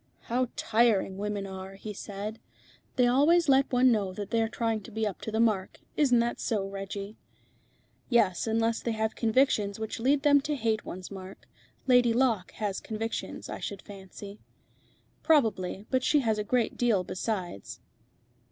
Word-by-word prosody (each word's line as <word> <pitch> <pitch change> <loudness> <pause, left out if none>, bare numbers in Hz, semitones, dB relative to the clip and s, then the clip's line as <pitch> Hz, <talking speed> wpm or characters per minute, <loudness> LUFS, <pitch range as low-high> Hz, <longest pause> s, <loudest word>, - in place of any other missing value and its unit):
"How 250 +2 0
tiring 215 -4 +2
women 205 -1 -2
are," 190 0 -8
he 210 +2 -7
said. 205 +2 -6 0.6
"They 250 - +4
always 300 +7 +4
let 270 0 +4
one 250 0 +5
know 200 -4 0
that 205 0 -6
they 230 -1 +2
are 225 - 0
trying 225 -2 -1
to 230 - -12
be 220 +1 -1
up 205 -4 -4
to 220 - -5
the 220 - -1
mark. 215 -5 +1 0.2
Isn't 250 -5 +4
it 235 - -3
so, 205 -4 -1
Reggie?" 195 +1 -6 0.9
"Yes, 225 -6 +2
unless 225 +1 +1
they 235 - -1
have 220 0 -1
convictions 220 -4 +2
which 220 0 -4
lead 275 +4 +2
them 285 -1 +5
to 300 +1 -2
hate 225 -5 -1
one's 185 +2 -7
mark. 190 0 -10 0.4
Lady 245 -2 +5
Locke 230 -6 +1
has 205 -3 -3
convictions, 225 +1 -5
I - - -6
should 200 -1 -6
fancy." 200 +1 -10 0.8
"Probably. 215 - +2
But 260 -1 +2
she 295 +1 +3
has 220 -4 0
a - - 0
great 240 +1 0
deal 225 -6 +2
besides." 185 - -4
220 Hz, 170 wpm, -28 LUFS, 200-245 Hz, 0.9 s, one